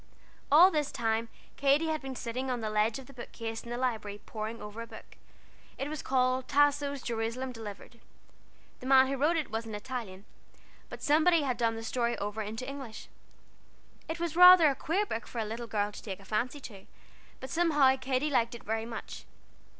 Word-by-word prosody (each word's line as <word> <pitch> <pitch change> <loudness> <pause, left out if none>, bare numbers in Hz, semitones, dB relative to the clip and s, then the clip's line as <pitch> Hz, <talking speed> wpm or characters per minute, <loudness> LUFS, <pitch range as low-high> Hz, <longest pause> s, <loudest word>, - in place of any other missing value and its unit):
All 345 +6 +8
this 300 -4 -1
time 225 0 -1 0.3
Katy 280 +3 +3
had 310 -1 -1
been 270 -1 -6
sitting 250 +2 -4
on 250 -1 -1
the 215 -1 -3
ledge 215 +1 +1
of 270 - -10
the 275 - -15
bookcase 230 -2 -6
in 235 - -10
the 240 - -3
Library, 220 -5 -2
poring 220 +1 -5
over 210 +2 -8
a 230 - -7
book. - - -13 0.6
It 275 - -3
was 310 -2 -5
called 255 0 +1
Tasso's 285 -1 +2
Jerusalem 235 +3 -3
Delivered. 225 +1 -9 0.8
The 255 - -8
man 265 0 +7
who 275 - -1
wrote 305 +5 +2
it 305 -8 -3
was 225 +1 -3
an 220 - -5
Italian, 210 -4 -6 0.6
but - - -9
somebody 320 +2 +4
had 260 -3 0
done 230 -1 0
the 225 - -6
story 235 +1 -1
over 205 +2 -3
into 220 +4 -5
English. 270 -5 -8 1.0
It 320 - -3
was 335 -2 -2
rather 360 -3 +9
a - - -4
queer 375 +10 0
book 230 - -5
for - - -9
a 225 - 0
little 230 +2 -5
girl 210 -2 -1
to - - -10
take 195 -3 -6
a 195 - -15
fancy 240 +7 -2
to, 200 -7 -11 0.5
but 260 - -8
somehow 295 -6 +4
Katy 265 +3 -1
liked 235 -3 +1
it 235 - -11
very 220 +1 -2
much. 230 -1 -8
250 Hz, 195 wpm, -30 LUFS, 225-280 Hz, 1.0 s, rather